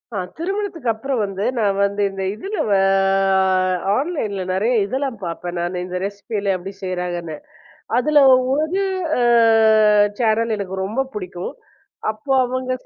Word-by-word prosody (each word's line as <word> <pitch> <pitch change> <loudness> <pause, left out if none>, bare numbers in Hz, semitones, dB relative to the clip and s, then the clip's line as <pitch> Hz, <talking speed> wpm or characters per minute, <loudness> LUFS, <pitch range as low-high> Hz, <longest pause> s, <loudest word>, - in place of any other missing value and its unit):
ஆ - - -2 0.2
திருமணத்துக்கப்பறம் 320 - -2
வந்து, 195 0 -3
நான் 200 -3 +1
வந்து 200 +1 -2
இந்த 195 0 -5
இதுல 390 - -6
வ 200 - +3 0.7
அ - - +4 0.5
ஆன்லைன்ல 225 - -2
நிறைய 210 +7 +1
இதெல்லாம் 260 +1 -3
பார்ப்பேன் 175 +1 -5
நானு. 175 +1 -2
இந்த 180 0 -4
ரெசிப்பிலாம் 200 -1 -2
எப்பிடி 190 +2 -8
செய்கிறாங்கன்னு. 175 -3 -3 0.6
அதுல 300 +4 +2 0.4
ஒரு 315 +7 0 0.4
அ - - +1 1.0
சேனல் 230 -1 +1
எனக்கு 190 -2 -5
ரொம்ப 240 +7 -1
பிடிக்கும். 180 -3 -5 0.6
அப்போ 220 +6 -7
அவுங்க, 255 +1 -3
210 Hz, 125 wpm, -20 LUFS, 190-260 Hz, 1.0 s, அ